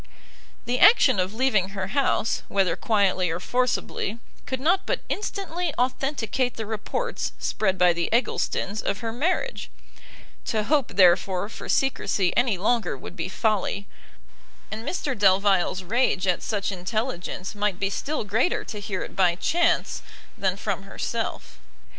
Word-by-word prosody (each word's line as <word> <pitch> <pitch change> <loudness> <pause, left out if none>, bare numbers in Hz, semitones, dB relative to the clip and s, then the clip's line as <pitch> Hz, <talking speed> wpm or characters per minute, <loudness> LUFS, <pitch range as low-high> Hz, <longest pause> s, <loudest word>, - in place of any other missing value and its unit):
The 245 +1 0
action 290 - +6
of 185 +1 0
leaving 220 -7 +2
her 195 -1 -4
house, 255 -1 +1
whether 195 -2 +1
quietly 195 -5 +2
or 165 +1 -2
forcibly, 245 -1 -1 0.3
could 260 0 -2
not 345 +8 +2
but - - 0
instantly 360 -5 -3
authenticate 255 -1 0
the 220 - -4
reports 220 - -3
spread 190 -3 0
by 180 -1 +5
the 170 0 -1
Egglestons 220 -3 0
of 200 +3 -2
her 225 -1 -3
marriage: 365 - -1 0.8
to 215 -2 0
hope 270 -5 +1
therefore 185 +1 +4
for - - -9
secresy 200 -8 +1
any 240 -5 +2
longer 230 +5 0
would - - -10
be - - -3
folly, 205 -2 0 0.9
and 215 +1 -5
Mr 295 -7 -2
Delvile's 190 -2 +3
rage 200 -1 +1
at 180 -2 +1
such 205 -2 -2
intelligence 190 0 -3
might 205 -3 -1
be 195 0 0
still 300 +6 -2
greater 225 - +1
to 210 - -6
hear 200 -2 -3
it - - -9
by 180 -3 +3
chance 340 - +1 0.3
than 190 -1 0
from 200 -2 -2
herself. 195 - -4
210 Hz, 145 wpm, -25 LUFS, 190-255 Hz, 0.9 s, action